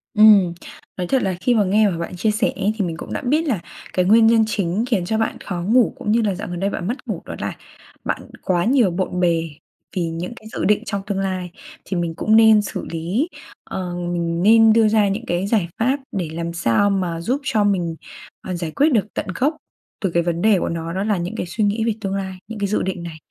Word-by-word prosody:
Ừm, 205 -5 +7 0.4
nói 180 -1 -2
thật 265 +4 +2
là 190 -1 0
khi 245 -1 +2
mà 210 - +4
nghe 205 +2 +3
mà 170 - -3
bạn 170 +2 -5
chia 215 +4 +1
sẻ 215 +2 +1
ấy 200 +2 0
thì 200 - 0
mình 165 -1 -4
cũng - - -7
đã - - -2
biết 300 +5 +1
là 220 -10 0 0.3
cái 180 -1 +2
nguyên 225 +3 +6
nhân 225 -1 +5
chính 200 +1 -1
khiến 195 -8 0
cho 220 +4 0
bạn 220 - -1
khó 175 -2 -3
ngủ, 230 +6 +3
cũng 210 - -2
như 230 +1 +3
là 200 -4 0
dạo 205 +3 -6
gần 175 -1 -5
đây 195 +1 0
bạn 175 - -4
mất 245 +5 -4
ngủ, - - -3
đó - - -6
là - - -3 0.5
bạn - - -2 0.2
quá 175 -1 +1
nhiều 240 -7 +3
bộn 180 0 -2
bề, 165 -2 +1 0.5
vì 175 -2 0
những 170 +7 -5
cái 220 -4 -13
dự - - -2
định 210 +3 +3
trong 200 -2 -3
tương 195 -2 -1
lai, 185 -2 -3 0.3
thì 185 - -3
mình 170 -1 -1
cũng 215 +4 +2
nên 220 -1 +7
xử 205 - -5
lý, 180 - -1 0.4
ờ, 180 -2 -5 0.2
mình 170 0 -1
nên 225 +1 +7
đưa 225 -1 +5
ra 210 -1 +3
những 215 +5 -2
cái 175 +3 -1
giải 205 -6 +1
pháp 260 +5 +2 0.2
để 170 -4 -2
làm 170 0 -4
sao 170 - +2
mà 175 -4 -1
giúp 255 +10 -1
cho 215 -5 +1
mình, 175 -5 0 0.5
ờ, 185 - -4
giải 170 -2 -4
quyết 295 - +3
được 210 -3 +3
tận - - -3
gốc 295 +4 +1 0.5
từ 190 - +1
cái 170 0 +2
vấn 170 0 -1
đề 210 -4 +4
của - - -2
nó, 165 0 -4
đó 190 +2 -1
là 210 -3 +1
những 175 +1 -4
cái - - -3
suy 210 +5 -2
nghĩ 210 +2 +1
về 225 - +1
tương 195 -1 -2
lai, 190 -1 -4
những 220 -2 -7
cái 200 - 0
dự 210 - 0
định 180 -2 -3
này. 165 -2 -7
195 Hz, 255 wpm, -21 LUFS, 175-220 Hz, 0.5 s, Ừm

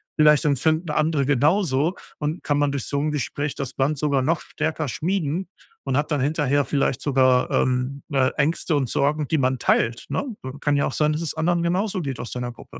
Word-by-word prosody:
Vielleicht 150 0 +5
empfinden 155 +4 +1
andere 150 -2 +1
genauso 150 +3 +2 0.2
und 150 +3 -3
kann 145 - +1
man 145 -1 +2
durch 140 -3 -3
so 140 - -1
'n 150 +2 0
Gespräch 145 0 -2
das 135 -3 -5
Band 145 +3 0
sogar 140 -1 +1
noch 155 +5 +1
stärker 155 0 -3
schmieden 170 +5 -2 0.4
und 135 -1 -1
hat 150 +2 -1
dann 145 -3 +1
hinterher 145 0 +1
vielleicht 135 -1 0
sogar, 130 -3 +3
ähm, 130 +2 0
äh, 130 -1 +3
Ängste 155 +2 +1
und 135 -3 0
Sorgen, 145 +1 0
die 160 - +1
man 130 -2 +1
teilt, 115 0 +1
ne? - - -1 0.2
So 130 0 -6
kann 145 0 +1
ja 140 - +2
auch - - -4
sein, 150 0 +2
dass 155 - -3
es 165 - -3
anderen 170 +2 +1
genauso 185 +3 0
geht 135 -5 -4
aus 120 - -7
deiner 125 -1 -4
Gruppe. - - -13
145 Hz, 210 wpm, -23 LUFS, 135-155 Hz, 0.4 s, Vielleicht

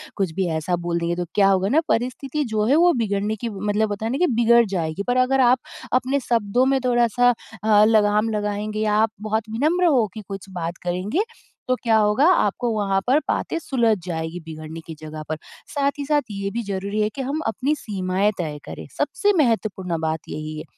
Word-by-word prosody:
कुछ 190 -5 -1
भी 190 0 0
ऐसा 170 +3 -1
बोल 170 0 0
देंगे 170 +1 -1
तो 175 0 -3
क्या 200 -1 +5
होगा 190 +1 +2
ना 300 - +4
परिस्थिति 260 +5 -1
जो 215 -1 +2
है 265 +6 +4
वो 350 +2 +5
बिगड़ने 210 -2 -1
की 230 +2 -4
मतलब 210 +1 -1
होता 205 +2 -4
है 230 - -1
ना 270 - -1
कि 360 - +3
बिगड़ 235 -2 +4
जाएगी। 180 -2 -2
पर 245 - +1
अगर 255 +1 +3
आप 250 0 +5 0.3
अपने 260 +2 +2
शब्दों 235 0 +1
में 270 0 +2
थोड़ा-सा 240 0 +3 0.3
अ, 215 -1 +5
लगाम 215 0 +3
लगाएँगे 210 0 -2
या 215 -1 +1
आप 220 0 +3
बहुत 220 0 -2
विनम्र 310 +11 +1
हो 260 -9 +4
के 215 - -7
कुछ 195 -1 -7
बात 175 -1 -4
करेंगे 185 - -1 0.4
तो 255 - +2
क्या 225 -2 +4
होगा 210 +6 +3
आपको 240 - 0
वहाँ 195 -2 +1
पर 275 +4 +4
बातें - - -1
सुलझ 235 -8 +1
जाएगी 160 0 -4
बिगड़ने 155 0 -8
की 160 - -7
जगह 155 0 -7
पर। 155 - -2 0.3
साथ 280 -1 0
ही 285 - -3
साथ 295 0 +2
ये 200 0 -3
भी 235 +2 -3
ज़रूरी 200 +1 -2
है 210 - +2
कि 270 - -3
हम 275 +4 -2
अपनी 265 +6 0
सीमाएँ 195 -3 -1
तय 155 -4 -3
करें, - - -8
सबसे 410 0 +1
महत्वपूर्ण 210 - 0
बात 160 0 -1
यही 155 0 -5
है - - -6
215 Hz, 210 wpm, -22 LUFS, 190-245 Hz, 0.4 s, क्या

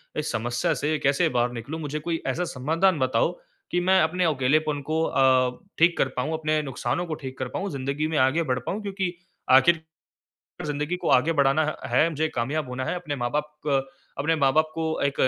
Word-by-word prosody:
इस 150 - -2
समस्या 120 +8 0
से 150 +3 -1
कैसे 140 0 +2
बाहर 120 -1 +1
निकलूँ, 125 +7 -6
मुझे 150 +1 -3
कोई 165 +1 -3
ऐसा 150 +7 0
समाधान 160 +6 +1
बताओ 130 +1 +2 0.4
कि 175 - +2
मैं 190 +1 +4
अपने 180 +3 +1
अकेलेपन 150 0 +1
को 160 +1 +1
अ, 130 -2 +3 0.2
ठीक 170 +1 +4
कर - - +2
पाऊँ, 150 +6 -1
अपने 155 -1 0
नुकसानों 135 +5 -2
को 160 - -4
ठीक 130 -2 -8
कर 130 - -2
पाऊँ, 195 +9 -4
ज़िंदगी 140 +3 -2
में 160 -1 -1
आगे 135 +6 +3
बढ़ 125 -3 -1
पाऊँ 210 +3 -2
क्योंकि 195 -3 -3 0.4
आखिर, 160 +6 +6 0.9
ज़िंदगी 150 +4 -2
को - - +1
आगे 150 +6 +4
बढ़ाना 140 +1 +3 0.2
ह - - -5
है, 165 - +5
मुझे 155 +1 -1
कामयाब 135 +3 -2
होना 130 +1 -3
है, - - -2
अपने 155 -5 -4
माँ-बाप 145 +5 -2
क 135 -2 +2 0.4
अपने 155 +3 +1
माँ-बाप 155 +2 +3
को 160 -1 -2
एक 140 -1 +1
150 Hz, 195 wpm, -25 LUFS, 130-160 Hz, 0.9 s, आखिर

